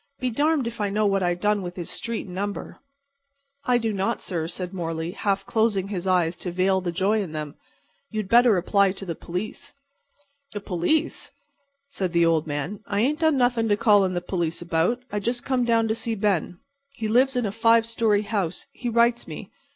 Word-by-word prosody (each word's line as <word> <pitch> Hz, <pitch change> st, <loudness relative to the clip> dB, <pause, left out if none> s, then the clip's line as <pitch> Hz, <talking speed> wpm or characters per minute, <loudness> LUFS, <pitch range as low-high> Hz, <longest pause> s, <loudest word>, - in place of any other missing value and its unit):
Be 255 Hz, -1 st, -1 dB
darned 290 Hz, +2 st, +1 dB
if 235 Hz, -1 st, -5 dB
I 205 Hz, -, +1 dB
know 210 Hz, +2 st, +1 dB
what 195 Hz, -1 st, +2 dB
I 175 Hz, -1 st, +1 dB
done 205 Hz, +3 st, +1 dB
with 175 Hz, -1 st, -6 dB
his 175 Hz, -2 st, -5 dB
street 230 Hz, -1 st, -4 dB
and 180 Hz, -, -10 dB
number." 200 Hz, +2 st, -4 dB, 0.9 s
"I 250 Hz, -1 st, +3 dB
do 225 Hz, -2 st, -1 dB
not, 195 Hz, -1 st, -1 dB
sir," 165 Hz, -4 st, -3 dB
said 180 Hz, +1 st, -5 dB
Morley, 165 Hz, -2 st, -3 dB
half 195 Hz, 0 st, -1 dB
closing 210 Hz, -4 st, +1 dB
his 190 Hz, -2 st, -4 dB
eyes 175 Hz, -2 st, +2 dB
to 180 Hz, -, -4 dB
veil 190 Hz, +2 st, +2 dB
the 175 Hz, -1 st, -2 dB
joy 200 Hz, +5 st, +1 dB
in 175 Hz, -6 st, -6 dB
them. 150 Hz, -2 st, -4 dB, 0.6 s
"You 215 Hz, -1 st, -2 dB
had 200 Hz, -, -9 dB
better 235 Hz, -1 st, +5 dB
apply 195 Hz, +2 st, +2 dB
to 195 Hz, -, -7 dB
the 170 Hz, -, -3 dB
police." 180 Hz, +6 st, -6 dB, 0.8 s
"The 205 Hz, -, -3 dB
police!" 200 Hz, -, -1 dB, 0.6 s
said 185 Hz, -9 st, -3 dB
the 170 Hz, 0 st, +4 dB
old 165 Hz, -1 st, +2 dB
man. 145 Hz, +7 st, -3 dB
"I 200 Hz, 0 st, 0 dB
ain't 295 Hz, +6 st, +1 dB
done 315 Hz, -3 st, +3 dB
nothin' 245 Hz, -3 st, +2 dB
to 205 Hz, -, +3 dB
call 210 Hz, -3 st, +5 dB
in 185 Hz, -1 st, -1 dB
the 175 Hz, -, -1 dB
police 175 Hz, -2 st, -2 dB
about. 175 Hz, +9 st, 0 dB
I 210 Hz, -, -1 dB
just 240 Hz, +4 st, -2 dB
come 255 Hz, -2 st, +1 dB
down 230 Hz, -1 st, +2 dB
to 220 Hz, -, +1 dB
see 230 Hz, 0 st, -3 dB
Ben. 195 Hz, -4 st, 0 dB, 0.4 s
He 220 Hz, -, -3 dB
lives 255 Hz, +4 st, +3 dB
in 245 Hz, -2 st, +1 dB
a 200 Hz, -, -1 dB
five 230 Hz, +1 st, +4 dB
story 225 Hz, -2 st, +1 dB
house, 195 Hz, -5 st, -2 dB
he 245 Hz, -, -4 dB
writes 235 Hz, +1 st, +2 dB
me. 160 Hz, +3 st, -8 dB
200 Hz, 210 wpm, -24 LUFS, 180-230 Hz, 0.9 s, better